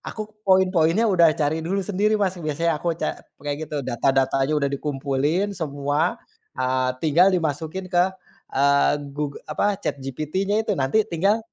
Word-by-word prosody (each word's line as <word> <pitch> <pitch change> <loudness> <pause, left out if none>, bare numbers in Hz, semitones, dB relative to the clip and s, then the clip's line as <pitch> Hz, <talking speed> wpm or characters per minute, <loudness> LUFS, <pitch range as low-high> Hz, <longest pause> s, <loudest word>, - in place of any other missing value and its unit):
Aku 215 - -3 0.2
poin-poinnya 185 0 +3
udah 170 -5 +5
cari 155 +1 0
dulu 190 +4 -1
sendiri 205 +3 +1
Mas. 190 -2 +1
Biasanya 155 0 -1
aku 170 0 -1
ca - - -2 0.3
kayak 145 +2 -3
gitu 150 - -4
data-datanya 135 +3 +1
udah 140 -1 0
dikumpulin 145 +6 -1
semua, 150 +5 -1 0.4
eee, 130 0 +1
tinggal 170 +5 +4
dimasukin 165 +2 -2
ke, 175 -1 +4 0.5
eee, 140 +1 +4 0.2
Goog 145 -1 -3
apa, 205 +5 0
ChatGPT-nya 155 - -2
itu 205 - +1
nanti 135 +11 +2
tinggal 195 +6 +2
160 Hz, 140 wpm, -23 LUFS, 140-185 Hz, 0.5 s, udah